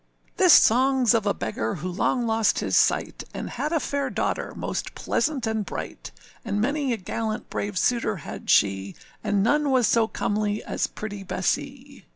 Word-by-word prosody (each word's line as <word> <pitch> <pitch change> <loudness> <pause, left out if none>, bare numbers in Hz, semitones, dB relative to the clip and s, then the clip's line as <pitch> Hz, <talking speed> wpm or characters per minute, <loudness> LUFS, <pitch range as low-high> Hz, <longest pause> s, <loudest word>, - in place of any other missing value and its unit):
THIS 370 -4 +8
songâs 255 0 +4
of 220 -3 +1
a 200 - +3
beggar 110 +2 -3
who 185 - -5
long 205 +7 0
lost 225 -2 +2
his - - 0
sight, - - +2
And - - -5
had 300 - -3
a 330 - +2
fair 280 -2 -2
daughter, - - -2
most - - -4
pleasant 280 -6 -1
and 220 -1 -1
bright, - - -7 0.3
And 205 -3 -2
many 280 +4 0
a 235 - 0
gallant 215 +2 -4
brave 205 -2 -3
suitor 230 0 +1
had 160 - -8
she, 95 -1 +2 0.3
And 200 -1 +1
none 290 +5 +2
was 255 -3 +3
so 225 +1 +3
comely 210 -1 -1
as - - -1
pretty 205 -2 -7
Bessee. 195 - -3
220 Hz, 175 wpm, -25 LUFS, 205-260 Hz, 0.3 s, THIS